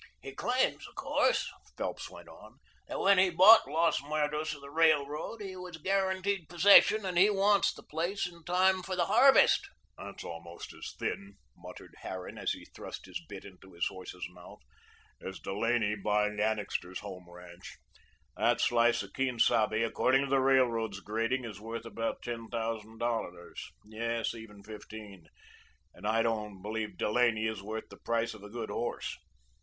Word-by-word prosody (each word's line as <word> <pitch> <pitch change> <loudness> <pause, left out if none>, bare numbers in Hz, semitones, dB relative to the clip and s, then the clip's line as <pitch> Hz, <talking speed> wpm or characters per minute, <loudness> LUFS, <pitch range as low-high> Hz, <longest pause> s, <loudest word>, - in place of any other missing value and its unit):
"He 135 - -7
claims, 250 - 0
of - - -18
course," - - +1 0.3
Phelps - - -4
went - - -13
on, - - -15 0.3
"that - - -4
when 195 -1 +5
he 190 0 +5
bought 190 +6 +8
Los 165 -3 +2
Muertos 150 +1 -1
of 140 - -13
the 140 0 -11
Railroad 155 +6 +1
he 190 -2 -6
was 180 -2 -8
guaranteed 190 0 0
possession, 200 +4 +6
and 180 -2 0
he 200 +3 +7
wants 200 -1 +3
the - - -13
place 175 +6 -2
in 170 -1 -9
time 185 +2 +3
for 185 +1 -4
the 175 -1 +1
harvest." 250 +8 +5 0.3
"That's - - -8
almost 85 0 -8
as - - -8
thin," 100 0 -4 0.2
muttered - - -12
Harran 95 -1 -7
as - - 0
he - - -10
thrust - - -9
the - - -14 0.2
bit - - -9
into 95 -1 -14
his 85 0 -1
horse's 90 -2 -8
mouth, 90 -1 -13 0.7
"as 95 - -6
Delaney 110 +2 0
buying 105 +1 0
Annixter's 105 -4 -2
Home 90 -3 -9
ranch. 90 0 -12 0.6
That - - +2
slice 120 -2 +3
of 100 - -12
Quien 130 -2 -1
Sabe, 110 -1 +3
according 130 +4 +2
to 140 - -4
the 135 - +4
Railroad's 120 -6 +2
grading, 115 +5 -1
is 105 -3 -8
worth 115 +1 -6
about 115 0 -4
ten 115 -2 -5
thousand 115 -1 -4
dollars; 110 -7 -4
yes, 115 +2 -2
even 110 -3 -11
fifteen, 105 -4 -10 0.7
and 100 +4 -7
I 115 +1 +2
don't 105 -4 -3
believe 110 +1 -4
Delaney 110 0 +2
is 110 -3 -2
worth 110 +2 -6
the - - -12
price 115 0 -1
of 110 - -12
a 105 - -10
good 115 -1 -5
horse. 120 +3 -3
115 Hz, 170 wpm, -31 LUFS, 105-165 Hz, 0.7 s, bought